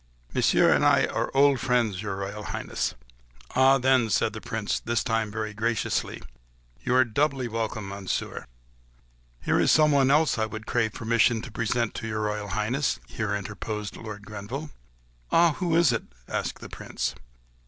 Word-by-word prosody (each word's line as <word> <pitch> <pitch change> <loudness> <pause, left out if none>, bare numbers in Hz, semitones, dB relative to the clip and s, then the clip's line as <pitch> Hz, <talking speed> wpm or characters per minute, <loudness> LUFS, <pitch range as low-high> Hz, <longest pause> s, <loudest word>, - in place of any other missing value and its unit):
"Monsieur - - +4
and - - +2
I - - +5
are - - -2
old 140 -1 +5
friends, 120 -7 +1
your 105 -3 -3
Royal 100 +2 -5
Highness." - - -3 0.6
"Ah, 135 +1 +6
then," 130 -3 +3
said 110 - +1
the 110 - -7
Prince, 110 -3 -2
this 115 0 -1
time 115 -2 0
very 110 0 -4
graciously, 110 +1 -1 0.6
"you 125 - +1
are 130 0 +6
doubly 135 +2 0
welcome, 110 -3 -3
Monsieur." 100 -1 -4 1.0
"There - - +2
is - - +3
someone 145 -4 +5
else 150 -3 +3
I 110 - +1
would 110 +1 -7
crave 115 -3 0
permission 115 0 +2
to 125 - -8
present 115 +1 -1
to 115 - -5
your 110 -1 -2
Royal 105 -1 -2
Highness," 110 +8 -1
here 110 -4 -2
interposed 105 +1 -5
Lord 105 -2 -8
Grenville. 105 +9 -6 0.6
"Ah! 170 0 +5
who 175 -3 +1
is 170 -6 +5
it?" 115 - -2 0.2
asked - - -3
the - - -7
Prince. - - -4
115 Hz, 165 wpm, -26 LUFS, 105-130 Hz, 1.0 s, Ah